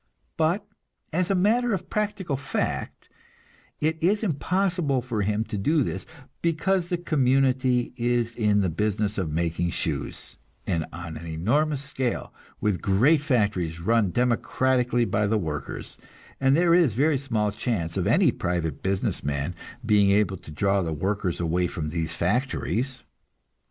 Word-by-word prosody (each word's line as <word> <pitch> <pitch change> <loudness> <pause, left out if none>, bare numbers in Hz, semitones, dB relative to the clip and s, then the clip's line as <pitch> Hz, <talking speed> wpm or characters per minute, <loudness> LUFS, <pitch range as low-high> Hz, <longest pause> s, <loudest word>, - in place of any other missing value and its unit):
But, 170 +6 +1 0.5
as 180 +2 +1
a 195 - +2
matter 225 +6 +2
of 185 - -7
practical 205 -7 -1
fact, 135 0 -3 0.7
it 160 +1 0
is 205 +6 +2
impossible 175 - 0
for 115 -4 -2
him 105 +2 0
to 105 -2 -5
do 150 +8 +2
this, - - -4 0.3
because 170 +2 +1
the 175 - 0
community 130 -6 +2
is 120 -1 0
in 105 -3 +2
the 95 - +1
business 105 +4 -1
of 90 -5 -1
making 85 +2 -1
shoes, 75 -4 -3 0.3
and 80 -2 -1
on 85 -1 -7
an 85 - -8
enormous 140 - 0
scale, 130 -4 -3 0.3
with 105 -4 0
great 120 +11 +4
factories 100 - 0
run 110 +3 +2
democratically 125 +2 +1
by 105 0 +1
the 110 +2 +2
workers, 80 -7 -4 0.4
and 135 +2 +4
there 170 0 +4
is 165 - +4
very 145 +2 +3
small 110 -6 0
chance 85 -8 -2
of 95 -1 0
any 155 - +4
private 85 -7 -2
business 95 0 -1
man 70 +4 -2 0.3
being 105 -3 +4
able 100 -1 +2
to - - -13
draw 95 +6 +1
the 80 -3 -2
workers 95 +2 -1
away 90 +1 +1
from 80 -3 -4
these 80 0 -2
factories. 125 +5 -1
115 Hz, 150 wpm, -25 LUFS, 90-145 Hz, 0.7 s, great